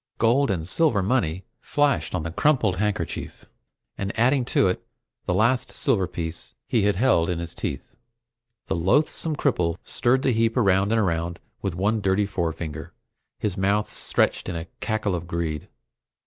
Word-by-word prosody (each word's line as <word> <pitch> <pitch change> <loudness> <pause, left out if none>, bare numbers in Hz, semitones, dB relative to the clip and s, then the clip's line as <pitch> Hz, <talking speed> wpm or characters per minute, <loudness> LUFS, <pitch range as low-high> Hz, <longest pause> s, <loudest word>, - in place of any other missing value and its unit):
Gold 120 +4 +3
and 85 -5 -1
silver 115 - +2
money 95 -6 0 0.2
flashed 145 -9 +1
on 85 - -2
the 85 - -4
crumpled 110 - +2
handkerchief, 100 -4 -3 0.5
and 100 0 -2
adding 125 +2 +3
to 100 - +3
it 90 - -1 0.4
the - - +2
last 120 +5 +2
silver 95 -4 +1
piece 85 -2 -6
he 115 - +1
had 100 0 +2
held 90 -6 +3
in 90 - 0
his 85 -1 -5
teeth, - - -4 0.8
the - - -1
loathsome 145 - +1
cripple 90 - +1
stirred 130 +2 +1
the 135 - +3
heap 115 0 +1
around 100 -2 +3
and 115 - +3
around 85 -3 -1 0.2
with 95 -4 -2
one 105 +4 +1
dirty 95 +1 +2
forefinger, 80 -5 -4 0.4
his 105 -4 -2
mouth 100 +2 +1
stretched - - 0
in 90 - -3
a 80 0 -4
cackle 110 -3 -1
of 85 -1 -3
greed. 85 -3 -3
95 Hz, 160 wpm, -24 LUFS, 85-115 Hz, 0.8 s, Gold